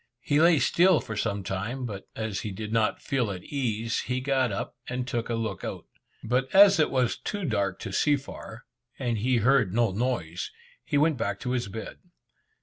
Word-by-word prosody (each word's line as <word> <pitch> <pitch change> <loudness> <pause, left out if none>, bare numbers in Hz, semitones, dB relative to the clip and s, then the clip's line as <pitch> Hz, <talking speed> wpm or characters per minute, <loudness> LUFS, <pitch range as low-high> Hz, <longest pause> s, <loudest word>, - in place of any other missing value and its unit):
He 145 +1 +2
lay 170 -1 +6
still 175 +4 +4
for 110 - -6
some 100 -1 -1
time, 105 +8 -3
but 100 -4 -7
as 110 -3 -3
he, 105 - -4
did 105 +2 -6
not 110 -2 +1
feel 125 -5 0
at 95 -2 -5
case, 115 -5 -2
he 125 +1 -2
got 130 -2 +1
up, 100 - -4
and 125 0 -3
took 120 -2 -2
a 115 - 0
look 115 -1 -3
out. - - -5 0.4
But 125 +3 +1
as 195 -2 +8
it 155 - +4
was 130 -3 +1
too 205 -3 -4
dark 100 - 0
to - - -5
see 150 -1 +3
far, 130 -4 -9 0.3
and 120 -4 -1
he 125 +3 +2
heard 115 -4 +3
no 115 -3 +3
noise, 95 -6 -2 0.3
he 145 - 0
went 150 0 +3
back 100 -3 -2
to 125 - -2
his 125 -4 -1
bed. 110 +3 -7
120 Hz, 200 wpm, -27 LUFS, 105-135 Hz, 0.4 s, as